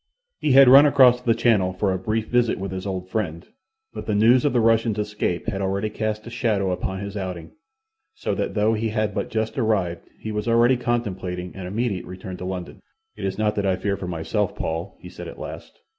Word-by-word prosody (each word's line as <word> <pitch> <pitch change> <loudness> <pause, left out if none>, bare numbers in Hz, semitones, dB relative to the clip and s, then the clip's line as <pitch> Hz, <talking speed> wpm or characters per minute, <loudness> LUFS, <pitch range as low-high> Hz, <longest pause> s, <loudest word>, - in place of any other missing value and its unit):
He 145 - +2
had 135 0 +8
run 140 +4 +9
across 125 -3 +5
the 115 -2 +2
Channel 105 -6 +2
for 95 +1 0
a 95 - -2
brief 110 +3 -1
visit 120 0 +1
with 95 -1 -5
his 95 +1 -5
old 95 -1 -4
friend, 90 -5 -3 0.5
but - - -7
the 105 - 0
news 115 +4 +5
of 145 - +2
the 125 - +2
Russian's 115 -1 +2
escape 105 -4 -2
had 100 -3 -2
already 100 +2 -1
cast 110 0 -3
a 115 - -8
shadow 105 -5 0
upon 95 +1 -3
his 100 0 -6
outing, 90 -4 -5 0.6
so - - -2
that - - -3
though 105 +1 +3
he 110 0 -1
had 110 -1 -1
but - - -3
just 110 +5 -2
arrived 100 -7 -1
he 110 - -5
was 105 +1 -3
already 120 +2 +4
contemplating 95 -7 -3
an 95 -2 -6
immediate 105 -1 -2
return 90 0 -7
to 90 - -7
London. 90 -1 -6 0.3
"It - - -5
is 95 0 -2
not 105 -1 +1
that 100 - 0
I 95 - +2
fear 100 +1 -1
for 95 - -6
myself, 90 +4 -2
Paul," 80 +4 -4
he - - -11
said - - -9
at - - -9
last. - - -9
105 Hz, 220 wpm, -23 LUFS, 95-115 Hz, 0.6 s, run